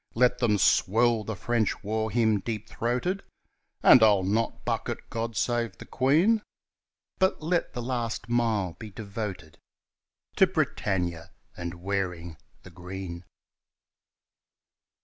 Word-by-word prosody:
Let 125 +1 +3
them 110 -4 +2
swell 115 +4 +3
the 110 +1 -4
French 110 +1 -1
war 110 +1 -1
hymn 110 -2 +2
deep 110 +1 -5
throated 125 - -1 0.6
(And 125 - +8
I'll 105 -3 +5
not 110 +5 -1
buck - - -1
at - - -6
"God 115 -2 -3
Save 120 -3 0
the - - -10
Queen") 165 - +3 0.8
But 190 -4 +1
let 170 +2 0
the 120 - -4
last 120 -2 -3
mile 115 -7 +1
be 110 - -7
devoted 100 -5 -6 0.8
To 190 - +6
"Britannia" 95 - -1 0.3
and 85 0 -5
"Wearing 90 -5 -3 0.3
the - - -13
Green." 90 -1 -7
110 Hz, 125 wpm, -27 LUFS, 95-120 Hz, 0.8 s, And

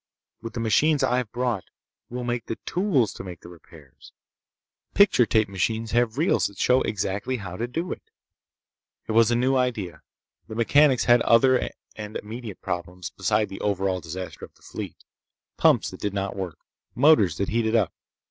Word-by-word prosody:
With 115 -1 -7
the 120 - -4
machines 140 +7 +2
I've 125 -3 0
brought, 120 -5 -1 0.4
we'll 125 +1 -5
make 120 -1 -3
the 115 - -3
tools 175 - +1
to - - -8
make 90 -3 -9
the - - -12
repairs. 80 -5 -16 0.8
Picture 195 - +5
tape 110 -1 +2
machines 105 +4 -2
have 120 0 +1
reels 165 +6 +2
that 100 - -14
show 125 +6 +3
exactly 105 +5 -2
how 90 -5 -7
to 115 +5 -3
do 165 +9 -4
it." - - -5 1.1
It - - -2
was 115 0 +5
a 120 - +2
new 130 +3 +2
idea. 110 -11 -1 0.5
The 110 - -7
mechanics 130 +3 +4
had 120 0 +5
other 130 +2 +4 0.3
and 105 0 -6
immediate 110 -1 -8
problems 90 0 -5
beside 105 +2 0
the 95 - -8
overall 95 -2 0
disaster 90 +2 -7
of - - -11
the - - -26
fleet. - - -7 0.6
Pumps - - +3
that - - -10
did 105 -1 -3
not 100 0 -2
work. 95 -4 -5 0.4
Motors 120 - +4
that 100 - -1
heated 115 0 +1
up. 105 -7 +2
110 Hz, 175 wpm, -25 LUFS, 95-125 Hz, 1.1 s, Picture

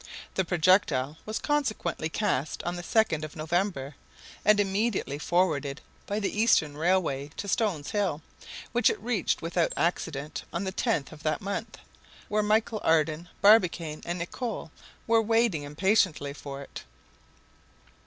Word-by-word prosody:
The 190 - +1
projectile 160 -5 +2
was 215 - -2
consequently 225 - -1
cast 160 -7 -1
on 175 +1 -2
the 175 - -5
2nd 175 -5 +1
of 155 - -7
November, 160 -3 -1 0.5
and 210 0 +5
immediately 200 -7 0
forwarded 150 -5 +1 0.3
by 205 +1 -1
the 210 +1 -1
Eastern 155 -10 +3
Railway 155 -4 +1
to 200 - -4
Stones 195 -8 0
Hill, 190 -8 -1 0.5
which 240 -1 +4
it - - -2
reached 220 -7 -1
without 170 0 0
accident 155 -4 -1
on 170 - -2
the 190 - -2
10th 205 - 0
of 155 -1 -12
that 155 -1 0
month, 205 +2 -4 0.5
where 210 +1 +2
Michel 215 +1 +1
Ardan, 160 +1 +2
Barbicane, 175 -7 +4
and 175 +1 -3
Nicholl 180 - -4 0.3
were 225 0 +4
waiting 225 -6 +2
impatiently 150 -1 +1
for 140 -1 -7
it. - - -9
175 Hz, 140 wpm, -28 LUFS, 155-210 Hz, 0.5 s, and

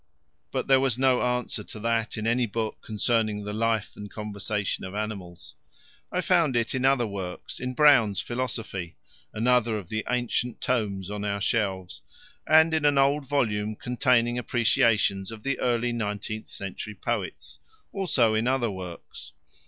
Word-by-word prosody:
But - - -1
there 135 -1 +5
was 130 -3 +1
no 130 -1 +3
answer 125 0 -1
to 125 -7 -9
that 115 0 0
in 110 - -3
any 120 +1 +2
book 110 +1 -3
concerning 110 -1 0
the 105 0 -4
"life 110 0 0
and 105 0 -8
conversation 105 -1 -3
of 95 +1 -6
animals." 95 -7 -6 0.6
I 180 - 0
found 170 -8 +3
it 115 -1 0
in 130 -1 -1
other 135 -3 +4
works: 95 -4 -6
in 130 0 -4
Brown's 120 -10 +5
Philosophy 115 -9 -4 0.4
another 120 0 +2
of 95 -4 -8
the 110 0 -2
ancient 120 -1 -1
tomes 100 -6 -1
on 105 0 -4
our 100 -1 -1
shelves 95 -4 -1 0.5
and 160 +1 +6
in 160 -1 +1
an 145 -1 +4
old 140 +1 +3
volume 110 -6 0
containing 125 0 +1
appreciations 110 -5 +2
of 110 -1 -9
the 140 -1 -1
early 120 0 +1
nineteenth 110 -1 -4
century 100 +2 -6
poets; - - -4 0.3
also 140 - +2
in 110 +2 +1
other 125 -4 +1
works. 90 -3 -9
115 Hz, 155 wpm, -26 LUFS, 105-125 Hz, 0.6 s, and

